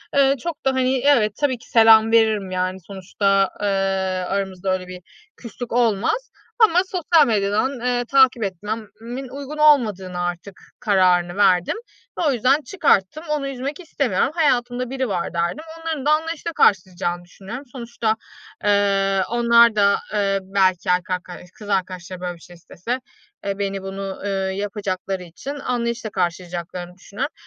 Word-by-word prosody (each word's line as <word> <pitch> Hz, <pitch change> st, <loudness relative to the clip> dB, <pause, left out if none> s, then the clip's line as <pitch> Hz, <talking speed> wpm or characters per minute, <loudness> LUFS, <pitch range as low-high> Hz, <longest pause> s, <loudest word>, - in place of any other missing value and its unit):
Eee, 275 Hz, 0 st, +4 dB
çok 320 Hz, -4 st, -5 dB
da, 270 Hz, -, +3 dB
hani, 260 Hz, 0 st, +1 dB
evet, 235 Hz, -8 st, +4 dB
tabii 275 Hz, -4 st, +1 dB
ki 230 Hz, -, -19 dB
selam 225 Hz, -1 st, +6 dB
veririm, 220 Hz, -4 st, +3 dB
yani, 185 Hz, 0 st, -2 dB
sonuçta, 195 Hz, 0 st, +1 dB
eee, 205 Hz, -, 0 dB, 0.6 s
aramızda 190 Hz, -1 st, -2 dB
öyle 185 Hz, -1 st, -4 dB
bir 180 Hz, 0 st, -9 dB, 0.4 s
küslük 240 Hz, +1 st, -8 dB
olmaz 240 Hz, -, +1 dB, 0.3 s
ama 360 Hz, -5 st, +5 dB
sosyal 340 Hz, -4 st, +3 dB
medyadan, 215 Hz, +5 st, 0 dB
eee, 245 Hz, 0 st, 0 dB
takip 265 Hz, -3 st, +4 dB
etmemin 220 Hz, +6 st, -6 dB
uygun 280 Hz, +2 st, -7 dB
olmadığını 215 Hz, -12 st, +3 dB
artık 175 Hz, +2 st, -5 dB, 0.2 s
kararını 180 Hz, -3 st, +2 dB
verdim 180 Hz, -3 st, +3 dB, 0.4 s
ve -, -, 0 dB
o -, -, +4 dB
yüzden 260 Hz, +4 st, +2 dB
çıkarttım. 310 Hz, -, +1 dB
Onu 295 Hz, -2 st, -1 dB
üzmek 275 Hz, +3 st, -5 dB
istemiyorum. 275 Hz, -, 0 dB
Hayatımda 250 Hz, -5 st, +1 dB
biri 265 Hz, 0 st, -2 dB
var 180 Hz, -3 st, -2 dB
derdim. 170 Hz, -, -2 dB, 0.2 s
Onların 320 Hz, -4 st, -3 dB
da 300 Hz, -, +3 dB
anlayışla 325 Hz, +2 st, -1 dB
karşılayacağını 180 Hz, -, +1 dB
düşünüyorum. 205 Hz, +9 st, -9 dB
Sonuçta, 235 Hz, -3 st, -2 dB, 0.5 s
eee, 195 Hz, -1 st, +2 dB
onlar 235 Hz, -1 st, +5 dB
da, 200 Hz, -1 st, +4 dB, 0.2 s
eee, 200 Hz, -1 st, +1 dB
belki 190 Hz, -1 st, +1 dB
erkek 180 Hz, +1 st, +1 dB, 0.2 s
ark 180 Hz, -, -9 dB
kız 210 Hz, -1 st, -9 dB
arkadaşları, 185 Hz, -2 st, -3 dB
böyle, 180 Hz, -1 st, -4 dB
bir -, -, -18 dB
şey 175 Hz, -, -14 dB
istese 185 Hz, +8 st, -5 dB, 0.5 s
beni 195 Hz, 0 st, -2 dB
bunu 195 Hz, +1 st, -6 dB, 0.3 s
yapacakları 195 Hz, -2 st, -3 dB
için 180 Hz, -, -8 dB
anlayışla 235 Hz, -4 st, -2 dB
karşılayacaklarını 175 Hz, -1 st, -4 dB
düşünüyorum. 200 Hz, -, -5 dB
210 Hz, 140 wpm, -21 LUFS, 190-260 Hz, 0.6 s, selam